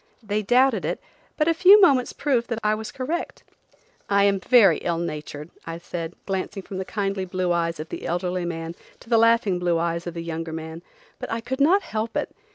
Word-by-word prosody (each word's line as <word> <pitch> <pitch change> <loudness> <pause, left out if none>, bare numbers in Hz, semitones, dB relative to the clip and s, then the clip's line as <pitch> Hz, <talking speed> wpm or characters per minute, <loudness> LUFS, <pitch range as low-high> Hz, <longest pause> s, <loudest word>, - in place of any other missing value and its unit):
They 210 0 -1
doubted 250 +6 +3
it, - - -2 0.4
but 305 - +2
a 330 - +4
few 370 +5 +7
moments 275 -10 +4
proved 260 -5 0
that 230 - -2
I 210 0 +3
was 220 0 -5
correct. 290 +7 -4 0.7
"I 200 0 +4
am 200 -1 +3
very 200 -5 +5
ill 170 -1 -1
natured," 155 -2 -6 0.2
I 165 0 -4
said, 170 -1 -6
glancing 195 0 -3
from 190 0 -7
the 190 - -3
kindly 195 -2 -2
blue 185 -1 -2
eyes 165 -2 0
of 155 +1 -6
the - - -6
elderly 180 +1 -2
man 165 -1 -4 0.3
to - - -16
the 230 - +5
laughing 230 -5 +3
blue 175 -1 +1
eyes 170 +1 -2
of 175 - -5
the 170 - -4
younger 165 -1 -5
man; 160 +1 -7 0.4
"but - - -6
I 225 - -1
could 260 +4 -4
not 370 +8 +4
help 220 +1 -3
it. - - -3
195 Hz, 210 wpm, -24 LUFS, 170-230 Hz, 0.7 s, few